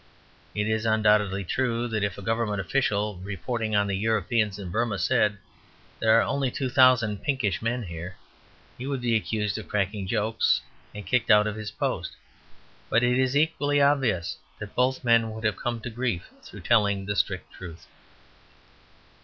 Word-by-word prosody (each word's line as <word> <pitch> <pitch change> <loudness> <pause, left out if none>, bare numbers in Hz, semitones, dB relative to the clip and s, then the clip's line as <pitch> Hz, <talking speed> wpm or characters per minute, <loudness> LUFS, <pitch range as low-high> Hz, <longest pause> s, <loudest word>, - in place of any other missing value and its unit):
It 105 0 0
is 110 0 0
undoubtedly 105 -3 +2
true 120 +3 -1
that 110 -2 -1
if 100 -3 -2
a 100 - -8
Government 115 -1 -1
official, 105 -1 0
reporting 105 +4 -3
on 100 0 +3
the 100 -1 -1
Europeans 110 0 0
in 95 -4 -7
Burmah, 110 0 0
said, 105 +3 +2 0.6
"There 110 0 +5
are - - +3
only 135 -2 0
two 130 +1 -3
thousand 125 -6 +4
pinkish 130 -9 -1
men 120 +2 -1
here" 85 0 -7 0.6
he 130 - -5
would 140 -2 -2
be 120 -2 +1
accused 110 -1 -1
of 110 - -9
cracking 100 -1 -2
jokes, 110 +2 +1 0.4
and 105 - -7
kicked 125 -2 0
out 105 0 +6
of 105 0 -2
his 110 -1 -5
post. - - -3 0.7
But 120 - +3
it 125 +1 +2
is 130 +1 +2
equally 145 -2 +1
obvious 135 - +2 0.2
that 105 0 -8
both 130 +1 +1
men 115 -2 +4
would 110 0 -8
have 110 -2 0
come 120 -1 -3
to 120 - -5
grief 115 -6 -3
through - - -12
telling 100 -2 +2
the 105 +1 -2
strict 95 -2 -2
truth. 85 -3 -10
110 Hz, 170 wpm, -26 LUFS, 100-120 Hz, 0.7 s, out